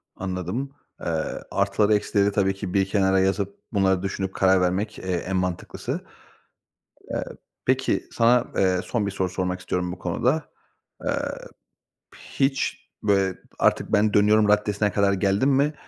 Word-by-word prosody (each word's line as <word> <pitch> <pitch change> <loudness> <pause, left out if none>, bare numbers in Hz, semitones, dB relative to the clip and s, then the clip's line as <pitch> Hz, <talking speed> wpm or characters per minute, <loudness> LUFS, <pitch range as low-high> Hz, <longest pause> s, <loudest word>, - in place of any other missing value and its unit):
Anladım. 95 +8 -3 0.3
Eee, - - -5 0.4
artıları, 100 +2 +2
eksileri 105 -1 +2
tabii 95 -1 +1
ki 95 -2 -6
bir 95 -1 +3
kenara 95 -1 +3
yazıp 100 +1 0 0.2
bunları 95 -2 +2
düşünüp 95 -1 -3
karar 95 -1 +4
vermek, 95 +4 -1
eee, - - -10
en 90 +2 -3
mantıklısı. 90 -2 -3 1.1
Eee, - - -2 0.4
peki, 130 +1 +1
sana, 120 +1 +4
eee, 95 -1 +2
son 110 -4 -1
bir - - -1
soru 95 -1 -1
sormak 90 0 -2
istiyorum 90 -1 -2
bu 90 - -8
konuda. 125 - 0 0.6
Eee, - - +1 1.1
hiç, 135 0 -2
böyle, 100 -3 +2 0.2
artık - - +2
ben 105 0 +3
dönüyorum 105 +1 +5
raddesine 105 0 +2
kadar 100 +1 +2
geldin 100 +7 +2
mi? 140 +3 +2
100 Hz, 140 wpm, -24 LUFS, 95-105 Hz, 1.1 s, dönüyorum